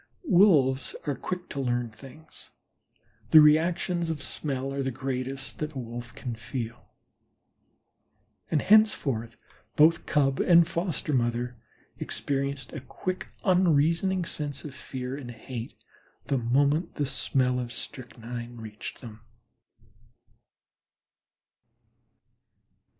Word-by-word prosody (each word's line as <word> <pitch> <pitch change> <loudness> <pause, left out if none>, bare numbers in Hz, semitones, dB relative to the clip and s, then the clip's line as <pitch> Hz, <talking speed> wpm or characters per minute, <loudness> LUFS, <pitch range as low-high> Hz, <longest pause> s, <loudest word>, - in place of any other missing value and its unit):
Wolves 160 - +4
are 145 - 0
quick 180 +5 -5
to 140 - -4
learn 120 -3 -1
certain 130 +4 -12
things. - - -14 0.8
The 160 - +9
reactions 170 +3 +3
of 160 -2 -2
smell 135 -2 -3
are 140 - -1
the 135 - -1
greatest 130 +1 -4
that 155 0 -3
a - - -7
Wolf 120 0 -7
can 125 - -5
feel, 115 +1 -6 1.6
and 155 - +2
thenceforth 140 - +3 0.4
both 160 +3 +5
Cub 135 -3 +2
and 170 -2 +6
foster 170 -4 -2
mother 120 0 0 0.4
experienced 140 -2 -2
a 150 - -4
quick, 185 +7 -4 0.2
unreasoning 180 0 +3
sense 145 -4 -3
of 145 - -7
fear 130 -2 -5
and 135 -4 -7
hate 120 0 -7 0.5
the 135 - 0
moment 140 +8 +1
the 145 - 0
smell 125 -1 0
of 120 -1 -4
strychnine 120 -1 -7
reached 110 -2 -8
them. 110 -3 -10
135 Hz, 110 wpm, -27 LUFS, 120-160 Hz, 1.6 s, The